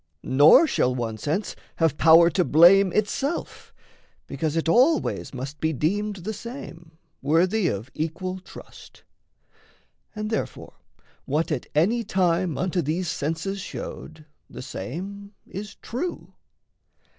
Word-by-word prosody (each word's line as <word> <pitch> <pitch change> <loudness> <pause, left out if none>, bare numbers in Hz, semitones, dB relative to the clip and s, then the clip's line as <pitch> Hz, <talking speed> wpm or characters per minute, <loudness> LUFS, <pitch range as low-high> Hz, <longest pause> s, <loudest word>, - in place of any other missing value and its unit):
Nor 145 - +6
shall 125 - +1
one 115 -3 -4
sense 160 - -2 0.2
have 160 -4 +1
power 165 +2 +6
to 180 - +2
blame 180 +5 +6
itself, 270 - -2 0.5
Because 150 +2 -3
it 165 - -1
always 260 - +2
must 135 +3 -7
be 160 0 0
deemed 205 +9 -1
the 200 +4 -5
same, 180 - -10 0.2
Worthy 180 +6 +2
of 110 -2 -4
equal 185 +4 -4
trust. 185 - -14 1.1
And 215 +1 -4
therefore 220 - -4 0.5
what 155 +4 -1
At 140 -5 -3
any 215 +10 +2
time 180 -5 0
unto 180 0 0
these 165 +3 -2
senses 165 +6 -3
showed, 155 -3 -8 0.2
The - - -9
same 200 - -7
is 205 +3 -8
true. 335 +9 -6
170 Hz, 120 wpm, -24 LUFS, 155-200 Hz, 1.1 s, Nor